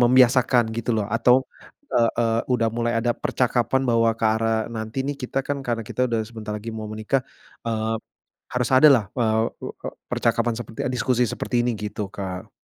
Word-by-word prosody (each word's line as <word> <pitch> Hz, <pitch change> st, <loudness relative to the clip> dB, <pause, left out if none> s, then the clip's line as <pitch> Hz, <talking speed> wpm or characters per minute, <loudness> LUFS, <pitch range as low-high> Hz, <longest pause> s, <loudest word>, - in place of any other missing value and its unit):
membiasakan 125 Hz, 0 st, +5 dB
gitu 115 Hz, +1 st, -2 dB
loh 105 Hz, -2 st, 0 dB
atau, 115 Hz, +2 st, +5 dB, 0.6 s
eee 115 Hz, -1 st, +4 dB
eee, 115 Hz, -1 st, +2 dB
udah 115 Hz, -2 st, +2 dB
mulai 120 Hz, 0 st, 0 dB
ada 120 Hz, +1 st, +1 dB
percakapan 125 Hz, +1 st, +1 dB
bahwa 115 Hz, -1 st, +4 dB
ke -, -, 0 dB
arah 115 Hz, 0 st, +1 dB, 0.2 s
nanti 110 Hz, +2 st, -5 dB
nih 145 Hz, 0 st, -2 dB
kita 125 Hz, +1 st, -2 dB
kan 145 Hz, -, 0 dB
karena 115 Hz, -2 st, -1 dB
kita -, -, -4 dB
sudah 115 Hz, -2 st, 0 dB
sebentar 110 Hz, -2 st, -7 dB
lagi 105 Hz, +2 st, -7 dB
mau 110 Hz, -, -5 dB
menikah, 110 Hz, +5 st, 0 dB, 0.4 s
eee, 110 Hz, -1 st, -1 dB, 0.6 s
harus 125 Hz, -1 st, 0 dB
adalah, 135 Hz, -5 st, +7 dB, 0.2 s
eee 110 Hz, -2 st, +2 dB, 0.3 s
eee -, -, -6 dB
eee, -, -, -5 dB, 0.2 s
percakapan 120 Hz, -, +1 dB
seperti 115 Hz, -1 st, -9 dB
eee, -, -, -2 dB
diskusi 125 Hz, -1 st, +2 dB
seperti 115 Hz, -, -4 dB
ini, 120 Hz, -, +1 dB
gitu 105 Hz, -1 st, -4 dB
Kak. 95 Hz, -2 st, -5 dB
115 Hz, 180 wpm, -23 LUFS, 110-125 Hz, 0.6 s, adalah